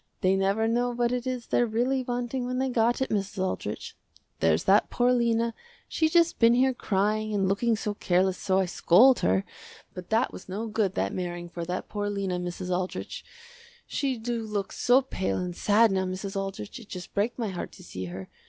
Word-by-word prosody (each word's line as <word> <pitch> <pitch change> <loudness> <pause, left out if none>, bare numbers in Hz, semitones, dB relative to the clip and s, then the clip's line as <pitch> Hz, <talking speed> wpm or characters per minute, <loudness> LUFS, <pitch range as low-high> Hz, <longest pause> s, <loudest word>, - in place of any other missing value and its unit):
They 190 +1 +3
never 195 +3 +1
know 240 +2 +1
what 240 0 0
it 250 0 -2
is 250 -2 -3
they're 240 - +2
really 245 +4 0
wanting 245 0 -3
when 255 0 -2
they 265 +1 0
got 240 +1 +2
it, - - -5
Mrs. 200 -2 -2
Aldrich. 185 - -3 0.4
There's 80 0 +2
that 200 +2 +4
poor 245 0 +2
Lena, 235 -1 +1 0.3
she 315 - +1
just 340 0 +3
been 230 0 +6
here 260 +1 +3
crying 215 0 0
and 195 -2 +1
looking 225 +4 +2
so 210 -1 -3
careless 185 -1 +1
so 190 -1 +1
I 190 - +3
scold 220 +9 +5
her, 95 +1 +1 0.5
but 180 -1 -9
that 225 +4 +1
was 185 - -10
no 205 +5 -3
good 215 -3 -1
that 95 +1 -1
marrying 175 -1 -4
for 170 -1 -5
that 180 +2 -4
poor 205 -1 -3
Lena, 195 -3 -2
Mrs. 180 +1 -3
Aldrich. 185 0 -4 0.6
She 270 -3 -1
do 230 +1 -3
look 210 -3 -3
so 255 +2 +3
pale 190 -7 -2
and 180 -1 -3
sad 215 +3 +4
now 190 -1 +1
Mrs. 190 +2 -5
Aldrich, 195 - -4
it 225 - -14
just 180 -1 -8
break 210 +4 0
my 230 -4 -2
heart 180 -2 -5
to 185 - -13
see 95 - -6
her. 95 +1 -7
210 Hz, 205 wpm, -27 LUFS, 185-240 Hz, 0.6 s, been